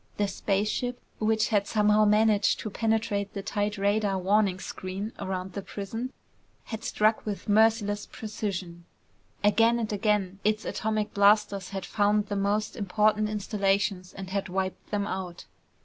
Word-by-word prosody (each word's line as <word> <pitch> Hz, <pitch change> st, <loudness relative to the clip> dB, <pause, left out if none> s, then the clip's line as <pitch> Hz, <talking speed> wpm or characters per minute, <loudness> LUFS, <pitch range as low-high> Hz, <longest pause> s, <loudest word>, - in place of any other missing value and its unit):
The 205 Hz, -, +1 dB
spaceship, 215 Hz, +6 st, -1 dB, 0.2 s
which 220 Hz, 0 st, +2 dB
had 200 Hz, -2 st, +1 dB
somehow 210 Hz, 0 st, +4 dB
managed 210 Hz, 0 st, +3 dB
to 215 Hz, -, -5 dB
penetrate 220 Hz, -2 st, -1 dB
the 200 Hz, -, -4 dB
tight 205 Hz, +1 st, -1 dB
radar 200 Hz, 0 st, +1 dB
warning 195 Hz, 0 st, +2 dB
screen 190 Hz, +4 st, -5 dB
around 185 Hz, -1 st, -4 dB
the 200 Hz, -, -4 dB
prison, 225 Hz, +6 st, -5 dB, 0.5 s
had 220 Hz, 0 st, -7 dB
struck 215 Hz, +1 st, +2 dB
with 205 Hz, -2 st, -5 dB
merciless 210 Hz, -1 st, +3 dB
precision. 190 Hz, -6 st, -5 dB, 0.6 s
Again 225 Hz, +3 st, +4 dB
and 220 Hz, -2 st, -2 dB
again, 200 Hz, -2 st, 0 dB
its 215 Hz, +1 st, +1 dB
atomic 215 Hz, -1 st, -2 dB
blasters 200 Hz, -1 st, +3 dB
had 195 Hz, -2 st, -5 dB
found 205 Hz, 0 st, +1 dB
the 205 Hz, -, -1 dB
most 205 Hz, +2 st, 0 dB
important 210 Hz, +2 st, +2 dB
installations 200 Hz, -3 st, 0 dB
and 190 Hz, -1 st, -8 dB
had 195 Hz, -1 st, -2 dB
wiped 190 Hz, 0 st, -3 dB
them 205 Hz, -1 st, -1 dB
out. 185 Hz, -3 st, -5 dB
205 Hz, 145 wpm, -27 LUFS, 195-215 Hz, 0.6 s, somehow